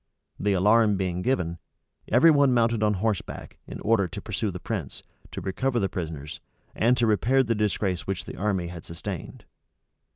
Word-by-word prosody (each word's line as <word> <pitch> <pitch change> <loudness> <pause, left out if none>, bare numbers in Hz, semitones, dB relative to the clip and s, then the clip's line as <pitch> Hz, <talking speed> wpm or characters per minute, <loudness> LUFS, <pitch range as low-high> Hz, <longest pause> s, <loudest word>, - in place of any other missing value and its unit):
The 100 0 +1
alarm 105 +2 +4
being 90 -2 -2
given, 90 -8 -1 0.5
every 130 +8 +6
one 140 -3 +4
mounted 115 -2 +2
on 105 -1 +2
horseback, 105 0 -3
in - - -7
order 110 -4 +2
to - - -7
pursue - - -3
the - - -6
prince, - - -5 0.3
to - - -5
recover 125 +6 -1
the 95 -3 0
prisoners, 80 -5 -6 0.3
and 120 +3 +2
to 120 - +3
repair 120 +5 +3
the 115 -2 0
disgrace 100 -4 -1
which 95 -2 -3
the - - -8
army 95 -4 -1
had 85 -2 -8
sustained. 85 0 -7
105 Hz, 170 wpm, -26 LUFS, 90-115 Hz, 0.5 s, every